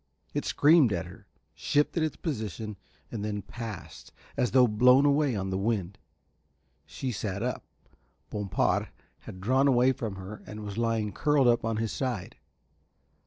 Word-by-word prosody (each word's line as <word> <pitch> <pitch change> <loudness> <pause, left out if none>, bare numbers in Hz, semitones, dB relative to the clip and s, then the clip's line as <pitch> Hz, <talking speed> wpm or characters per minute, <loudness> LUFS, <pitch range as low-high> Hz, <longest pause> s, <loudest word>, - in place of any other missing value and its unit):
It - - -2
screamed 150 -5 +5
at 85 -3 -1
her, - - -13 0.3
shifted 150 +3 +1
its 155 -2 -1
position, 110 - -4 0.4
and 110 -3 -4
then 105 -2 -3
passed, 115 -6 -8 0.2
as 125 - +1
though 125 +3 +6
blown 125 +5 +5
away 145 -3 +3
on 95 -1 -3
the 95 - -1
wind. 100 -3 -2 0.9
She 130 - -4
sat 100 -2 -3
up. - - -2 0.7
Bompard 105 -3 0 0.4
had 95 - -9
drawn 130 +8 +2
away 130 -1 +4
from 110 -5 -4
her 95 +2 -8
and 105 0 -7
was 105 +2 -5
lying 115 -2 0
curled 145 +4 +2
up 120 0 +3
on 115 -1 -1
his 110 -1 -1
side. 125 -9 -3
115 Hz, 155 wpm, -28 LUFS, 105-130 Hz, 0.9 s, though